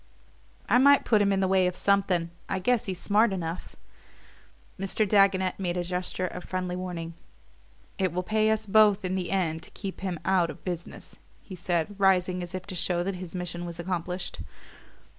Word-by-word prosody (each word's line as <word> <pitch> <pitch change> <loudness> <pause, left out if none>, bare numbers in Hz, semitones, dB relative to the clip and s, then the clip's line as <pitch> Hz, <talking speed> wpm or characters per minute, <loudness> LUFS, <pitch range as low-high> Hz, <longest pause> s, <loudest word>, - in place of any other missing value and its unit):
"I 245 - +5
might 280 +1 +6
put 215 -3 +4
him 200 -1 +3
in 195 0 +1
the 190 - +2
way 190 -1 +3
of 180 - -2
something 190 -4 +1 0.2
I 190 - 0
guess 225 +5 +1
he's 185 -2 -3
smart 210 +2 +3
enough." 175 -2 -5 1.0
Mr. 195 +2 0
Dagonet 190 -2 +3
made 180 -2 -1
a 175 - 0
gesture 180 +1 -2
of 180 0 -6
friendly 180 -1 -3
warning. 175 -2 -5 0.9
"It 190 -2 +1
will 180 +2 -2
pay 215 +2 +2
us 220 0 0
both 210 -1 +4
in 185 - -1
the 185 -2 -2
end 165 -4 0
to - - -9
keep 195 -3 -7
him 185 -4 -3
out 185 -3 +3
of - - -9
business," 175 -2 -6 0.3
he 195 - -10
said, 175 +1 -1
rising 185 -2 +3
as 175 +1 -6
if 185 -1 -5
to 190 - -7
show 175 0 0
that 190 0 -3
his 180 -1 -8
mission 175 -1 -4
was 170 -1 -6
accomplished. 180 +1 -3
185 Hz, 190 wpm, -27 LUFS, 175-195 Hz, 1.0 s, might